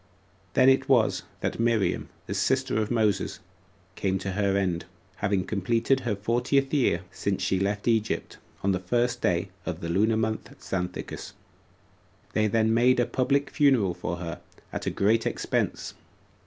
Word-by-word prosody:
6. - - -34
Then 130 - +6
it 135 0 +4
was 120 -5 +3 0.2
that - - -2
Miriam, 115 -3 +1 0.2
the - - -4
sister 110 - +1
of 105 - -2
Moses, 110 -5 +1 0.5
came 95 -1 0
to 95 +1 -4
her 100 0 +1
end, 90 -4 -1 0.3
having 100 -2 0
completed 115 +6 +1
her 120 -5 -1
fortieth 125 +7 +1
year 125 - +2
5 90 - -20
since 100 -2 -2
she 95 - +1
left 100 +2 -1
Egypt, 110 -2 0 0.2
on 100 - +3
the 95 - 0
first 120 +6 0
6 - - -27
day 90 +2 +1
of 90 -2 -4
the 85 - -5
lunar 110 +6 +2
month 110 0 -2
Xanthicus. 90 -1 -4 1.0
They 110 0 +2
then 110 +1 +2
made 125 +2 +4
a 120 - +3
public 130 +4 0
funeral 130 - +3
for 85 - -4
her, 85 -1 -6 0.3
at - - -4
a - - +4
great 110 +3 +2
expense. - - -2
110 Hz, 170 wpm, -27 LUFS, 95-120 Hz, 1.0 s, Then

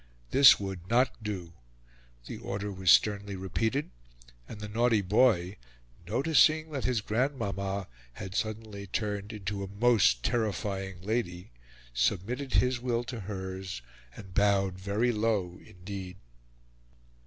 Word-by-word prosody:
This 135 0 +8
would 95 -3 -6
not 125 +1 +2
do: 95 -6 -5 0.7
the - - -7
order 100 +1 -4
was 95 -2 -1
sternly 100 0 +4
repeated, 110 +9 -1 0.6
and 105 - -8
the 105 - -5
naughty 110 0 +2
boy, 95 -2 +3 0.5
noticing 155 - +3
that 140 -3 -3
his 125 -4 +1
grandmama 100 -5 -2 0.3
had 95 +6 -7
suddenly 110 -1 -4
turned 105 +1 -3
into 100 -2 -4
a - - -5
most 100 - +3
terrifying 95 -5 -2
lady, 95 - -2 0.4
submitted 105 - -1
his 125 -1 +3
will 120 -1 -1
to 120 -1 -6
hers, 95 - -6 0.3
and 95 -2 -11
bowed 95 -2 +2
very 105 +6 +1
low 105 -5 -1
indeed. 95 0 -8
100 Hz, 120 wpm, -29 LUFS, 95-115 Hz, 0.7 s, This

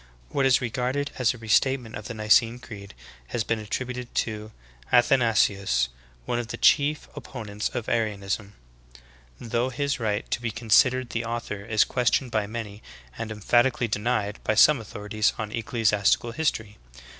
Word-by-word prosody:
What 135 - +2
is 130 - +4
regarded 125 +4 -2
as 125 - +3
a 125 - -8
restatement 120 +1 +1
of 105 - -7
the - - -6
Nicene 115 +2 +3
Creed 100 -5 -11 0.3
has 115 - -2
been 115 +1 -1
attributed 125 +3 -5
to 110 -1 -2 0.4
Athanasius, 110 - +3 0.4
one 120 - -1
of 120 - -4
the - - -6
chief 150 +2 +3
oppo 120 -5 -8
nents 105 +1 -3
of 120 - -3
Arianism, 105 -2 -2 0.8
though 120 +2 -1
his 140 +1 -2
right 105 -2 -1
to - - -1
be 115 - -2
considered 120 +3 +3
the 115 - -2
author 115 -3 -4
is 110 0 +3
questioned 125 0 0
by 110 -2 0
many 105 -2 -6 0.3
and 110 +6 -5
emphatically 120 +4 +2
denied 105 -1 -1
by 110 - +1
some 140 +3 +6
authorities 105 0 -1
on 110 -1 -4
ecclesiastical 115 -2 +1
history. 110 -8 -2
115 Hz, 155 wpm, -25 LUFS, 105-125 Hz, 0.8 s, some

